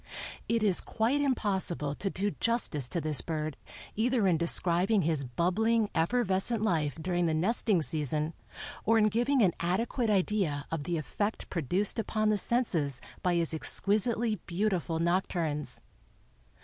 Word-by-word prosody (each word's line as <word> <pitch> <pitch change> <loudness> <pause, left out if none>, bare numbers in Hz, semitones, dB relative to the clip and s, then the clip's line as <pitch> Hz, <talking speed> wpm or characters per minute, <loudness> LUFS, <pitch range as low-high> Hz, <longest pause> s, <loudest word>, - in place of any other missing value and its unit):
It 230 -1 +1
is 195 -4 +4
quite 240 +6 0
impossible 190 - 0
to 195 +6 -3
do 200 +2 -1
justice 215 - 0
to 170 - -1
this 155 -3 -1
bird 155 -2 -3 0.4
either 235 0 +1
in 180 -3 +4
describing 175 +4 +2
his 155 -3 0
bubbling, 205 - +1
effervescent 200 +4 +1
life 155 -8 0
during 175 +1 0
the 160 - +1
nesting 190 0 +2
season 150 +2 -2 0.5
or 225 +2 +3
in 215 -1 +4
giving 240 +4 +2
an 180 -4 +3
adequate 220 +7 -1
idea 190 -8 0
of 160 -3 -3
the 175 -1 -1
effect 205 +7 -3
produced 185 - 0
upon 215 -1 0
the 210 -1 +2
senses 170 - 0 0.2
by 180 -1 +1
his 170 -1 0
exquisitely 215 +6 +1
beautiful 180 -3 -1
nocturnes. 170 -3 -1
185 Hz, 140 wpm, -30 LUFS, 160-220 Hz, 0.5 s, is